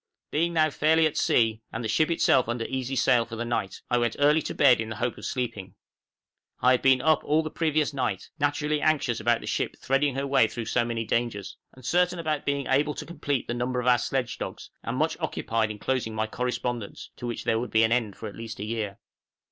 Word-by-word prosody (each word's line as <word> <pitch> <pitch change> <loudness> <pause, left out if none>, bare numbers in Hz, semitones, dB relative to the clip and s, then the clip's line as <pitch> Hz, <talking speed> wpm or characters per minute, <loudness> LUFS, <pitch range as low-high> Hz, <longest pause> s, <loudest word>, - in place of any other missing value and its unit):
Being 170 +3 +1
now 155 -2 +3
fairly 160 +3 +3
at 155 - 0
sea, 115 -2 +2
and 115 - -4
the - - -1
ship 155 +9 +2 0.4
under 120 -1 -2
easy 130 0 -3
sail 125 -2 +4
for 115 0 -8
the 120 +1 -3
night, 115 -5 -3
I 125 - +2
went 120 -1 0
early 150 +2 +4
to - - -5
bed 125 -3 +5
in 110 - -4
the 110 - -5
hope 120 +3 -2
of - - -8
sleeping. 115 -7 -4 0.8
I 125 - +4
had 130 - +3
been 130 -1 +4
up 155 -1 +3
all 155 +2 +2
the 155 - -5
previous 155 -2 0
night, 110 -8 -2
naturally 150 +1 0
anxious 140 -6 +1
about 120 -1 +2
the - - -8
ship - - -2
threading 135 0 +1
her 135 +1 -1
way 135 -5 +4
through 115 0 -5
so 120 - +1
many 115 -1 -2
dangers, 110 -4 -2 0.2
uncertain 175 +8 +1
about 155 -3 -2
being 140 -1 0
able 145 +3 +1
to - - -6
complete 145 -6 -2
the - - -2
number 125 +1 -1
of 125 - -3
our 125 -1 +5
sledge 125 0 -2
dogs, - - -6
and - - -4
much - - 0
occupied 115 -1 -1
in 105 - -6
closing 120 -1 -2
my 110 0 0
correspondence, 120 -1 -4
to 120 - -5
which 120 - -4
there 110 - +1
would 125 - -4
be 110 0 +4
an 115 - +2
end 115 -5 +1
for 110 - -7
at 105 - -8
least 115 -1 -7
a 105 - -3
year. 105 -3 -3
125 Hz, 230 wpm, -26 LUFS, 115-145 Hz, 0.8 s, bed